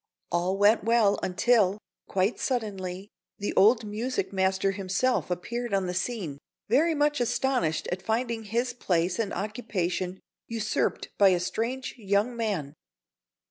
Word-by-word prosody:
All 180 +3 +1
went 205 +2 +4
well 225 -2 +3
until, 200 +1 +3 0.3
quite 195 +4 0
suddenly, 200 -6 -3 0.3
the 205 - -3
old 220 +3 +5
music 210 -2 -2
master 190 0 +1
himself 195 +6 0
appeared 235 +5 -2
on 195 -1 +1
the 180 - -2
scene, 185 - -3 0.3
very 315 +9 +3
much 295 -2 +2
astonished 240 -10 0
at 180 +1 -2
finding 225 +2 -1
his 240 +4 -1
place 180 -4 0
and 210 -3 0
occupation 190 -4 -2 0.3
usurped 225 -2 -1
by 200 -1 +7
a 180 -1 +3
strange 235 +8 -2
young 205 +3 +1
man. 200 -12 -2
205 Hz, 135 wpm, -27 LUFS, 185-235 Hz, 0.3 s, by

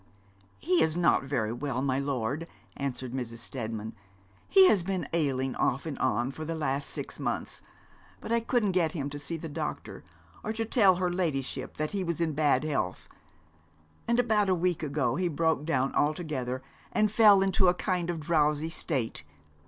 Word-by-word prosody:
'He 175 - +2
is 160 +1 +2
not 170 -5 +3
very 115 -5 -1
well, 130 0 -2
my 135 -1 +1
lord,' 140 +3 -2 0.3
answered 130 -2 -4
Mrs. 120 -3 -4
Steadman. 110 -2 -4 0.6
'He 385 -1 +8
has 205 - +4
been 185 +1 -2
ailing 135 -5 0
off 135 +5 0
and 155 -4 -5
on 120 +1 +1
for 155 - -7
the 165 +1 -3
last 140 -2 -1
six - - -5
months, - - -3 0.6
but - - -7
I 235 - +4
couldn't 230 -3 +1
get 175 -2 +1
him 145 -4 -3
to 145 - -6
see 145 +4 -4
the 165 - -6
doctor, 145 - -5 0.4
or 220 - -2
to 225 0 -2
tell 200 -5 +4
her 180 0 -1
ladyship 135 -7 -2
that 155 0 -2
he 200 -2 -1
was 170 -2 -2
in 165 -2 0
bad 145 -2 +2
health. 140 -12 -2 1.0
And 235 +1 +2
about 215 -4 +2
a 185 - +4
week 180 -1 0
ago 140 -4 0
he 180 0 +1
broke 160 -2 0
down 135 -4 0
altogether, 145 -5 -1 0.3
and 215 -1 +2
fell 210 -3 +6
into 190 -1 +3
a 180 - +4
kind 180 -2 -1
of 170 -2 -2
drowsy 150 -1 +1
state. 130 - -2
155 Hz, 180 wpm, -29 LUFS, 135-180 Hz, 1.0 s, He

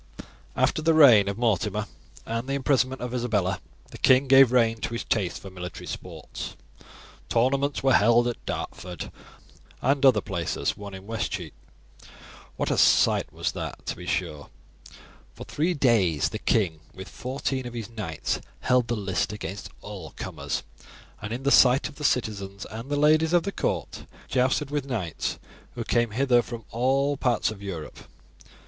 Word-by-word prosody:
"After - - +1
the 165 +1 +3
death 120 -10 +8
of 100 0 -2
Mortimer 115 -6 0 0.4
and 115 +3 -3
the - - 0
imprisonment 130 -1 +1
of 125 0 -4
Isabella, 105 -7 0 0.3
the - - -10
king 130 +1 +5
gave 135 -2 +7
rein 115 -3 +2
to 115 - -3
his 115 - -3
taste 95 -6 -1
for 95 - -10
military 90 -1 -7
sports. - - -7 0.7
Tournaments 135 +4 +1
were 135 -1 +4
held 120 +3 +5
at 120 - -4
Dartford 90 -2 -5 0.7
and 135 +2 +1
other 130 -6 +6
places, 95 -6 -2
one 100 -1 -8
in 95 0 -10
Westcheape. 100 -7 -4 1.0
What - - -1
a - - +1
sight - - +4
was - - -2
that, - - -6
to - - -3
be - - -10
sure! 75 -1 -3 0.9
For - - -8
three 170 +4 -1
days 105 - +2
the 110 - -5
king, 95 -10 +1 0.2
with 95 +1 -8
fourteen 130 0 -3
of 120 - -8
his 115 -3 -4
knights, 100 -9 -3 0.2
held 125 -2 +2
the 120 - 0
list 95 -3 -1
against 105 -1 -6
all 95 -7 -8
comers, - - -4 0.6
and 110 +1 -5
in 125 +3 -4
the 140 - +2
sight 130 0 +6
of 150 - -12
the 150 - -7
citizens 100 -7 -1
and 115 +5 -7
the 145 - 0
ladies 155 +3 +4
of 175 -1 +4
the 200 - -3
court, - - -3 0.2
jousted 130 +3 +1
with 145 -2 -1
knights 100 - -3 0.4
who - - -3
came 120 -1 +1
hither 120 +2 +3
from 120 -1 -8
all 135 +4 +1
parts 120 -4 +1
of 105 -2 -10
Europe. 85 -7 -7
120 Hz, 165 wpm, -26 LUFS, 100-135 Hz, 1.0 s, death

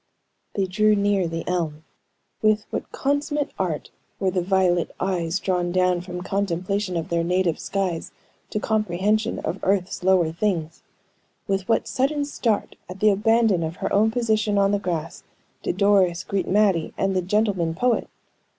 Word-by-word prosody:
They 195 - +1
drew 215 +3 +3
near 200 -3 +2
the 165 0 -5
elm. 160 -4 -2 0.6
With 215 0 +2
what - - -4
consummate 285 +1 -1
art 175 -5 -2 0.3
were 190 -1 +1
the 180 -1 0
violet 180 -2 +2
eyes 180 -2 0
drawn 180 -2 0
down 180 -1 +2
from 180 0 -6
contemplation 195 0 -1
of 165 +2 -4
their 170 0 +1
native 180 -1 +1
skies 185 -4 -2 0.4
to 210 - -2
comprehension 215 +1 0
of 180 - -2
earth's 190 -1 0
lower 180 -3 +3
things! 170 -3 -2 0.6
With 195 0 -2
what 225 - +3
a - - -14
sudden 285 +2 0
start 230 -7 -1
at 185 +1 -8
the 215 +1 +5
abandon 220 -2 +3
of 160 +1 -3
her - - -3
own 215 +2 +4
position 220 -3 +1
on 200 0 +3
the 205 - +1
grass 170 -5 -4 0.4
did - - -2
Doris 195 -3 +3
greet 195 -1 -2
Mattie 195 -5 +2
and 195 0 0
the 185 - +2
"gentleman 190 -3 0
poet!" 245 +5 +1
190 Hz, 160 wpm, -24 LUFS, 175-210 Hz, 0.6 s, the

